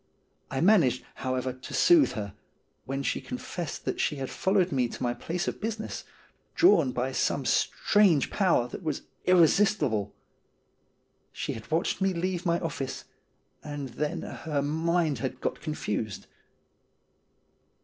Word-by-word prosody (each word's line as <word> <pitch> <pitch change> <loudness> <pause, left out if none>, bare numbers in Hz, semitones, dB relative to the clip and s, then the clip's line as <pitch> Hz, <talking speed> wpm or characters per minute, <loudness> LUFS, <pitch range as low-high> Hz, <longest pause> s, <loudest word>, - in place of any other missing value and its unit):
I 135 - -2
managed, 170 - +4
how 130 -1 -2
ever, 130 0 -2
to 130 0 -10
soothe 340 - +5
her, 105 -5 -5 0.5
when 135 +1 -3
she - - -1
confessed 250 - -6
that - - -2
she - - +1
had 135 -2 -5
followed 190 -1 +1
me 130 -3 +2
to - - -7
my 120 -1 +1
place 175 +7 -3
of - - -3
business, 220 0 -4 0.5
drawn 165 - +5
by 125 +2 -1
some - - 0
strange 195 -9 +3
power 175 - +2
that - - -7
was 155 -5 -3 0.2
irresistible. 170 - +3 1.2
She - - -4
had 110 - -9
watched 165 +4 0
me 190 -1 +2
leave 180 +1 -2
my 170 0 +2
office, 135 -5 -4 0.6
and 145 -2 -5
then 150 +6 -3
her 150 -3 -3
mind 160 +1 +1
had 130 - -3
got - - -3
confused. 110 - -3
155 Hz, 140 wpm, -28 LUFS, 130-185 Hz, 1.2 s, soothe